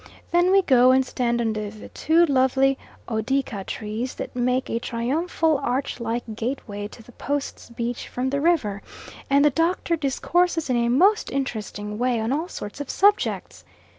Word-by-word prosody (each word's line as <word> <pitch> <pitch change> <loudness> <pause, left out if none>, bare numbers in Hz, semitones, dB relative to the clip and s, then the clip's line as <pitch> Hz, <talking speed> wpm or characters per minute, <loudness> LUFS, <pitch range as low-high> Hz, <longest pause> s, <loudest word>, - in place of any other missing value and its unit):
Then 350 +1 +4
we 390 0 +5
go 255 -5 +5
and 260 0 +4
stand 240 -2 -1
under 215 -2 -1
the 215 0 -11
two 330 +2 +3
lovely 270 -1 +3 0.3
odeaka 230 -2 -1
trees 220 +4 -4
that - - -6
make 250 +1 0
a 230 - -1
triumphal 300 +7 0
arch 260 +2 -2
like 235 +1 -2
gateway 220 -4 -4
to 225 - -14
the 245 - -16
Post's 285 +2 -4
beach 235 0 -4
from 255 +1 -2
the 280 0 0
river, 260 - +1 0.5
and 280 +1 +4
the 295 - +5
Doctor 335 +3 +1
discourses 325 +2 0
in - - +2
a 235 0 +1
most 380 - +3
interesting 210 -5 -4
way 245 -1 +1
on 220 +2 -1
all 310 +5 -1
sorts 210 - -7
of 285 - -6
subjects. 405 +1 +1
255 Hz, 165 wpm, -24 LUFS, 235-295 Hz, 0.5 s, we